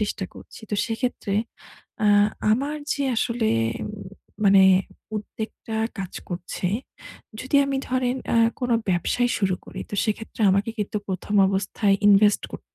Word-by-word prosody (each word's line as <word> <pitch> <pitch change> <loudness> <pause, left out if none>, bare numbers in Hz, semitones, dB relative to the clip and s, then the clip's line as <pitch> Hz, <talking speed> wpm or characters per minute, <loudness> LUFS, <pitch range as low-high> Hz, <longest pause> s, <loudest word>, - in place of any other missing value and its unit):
চেষ্টা 205 -2 -2
করছি। - - -13
তো - - 0
সেক্ষেত্রে 225 -3 -2 0.7
আ - - +5 0.4
আমার 280 +6 0 0.2
যে 285 - -2
আসলে 230 -1 0 1.0
মানে 195 -1 +7 0.5
উদ্বেগটা 220 +1 -6 0.2
কাজ 190 -2 -5 0.2
করছে, 175 0 -3 0.7
যদি 260 +2 0
আমি 275 -1 -1
ধরেন 255 0 0 0.2
আ - - +4 0.2
কোনো 245 -1 +1 0.2
ব্যবসাই 245 +8 +1
শুরু 190 -3 +1
করি - - -8
তো - - -4
সেক্ষেত্রে 220 +1 -4
আমাকে 200 +4 +1
কিন্তু 210 0 -2
১ম 190 +2 -3
অবস্থায় 195 +1 +1
ইনভেস্ট 205 0 +5
করতে - - -11
210 Hz, 130 wpm, -24 LUFS, 195-245 Hz, 1.0 s, মানে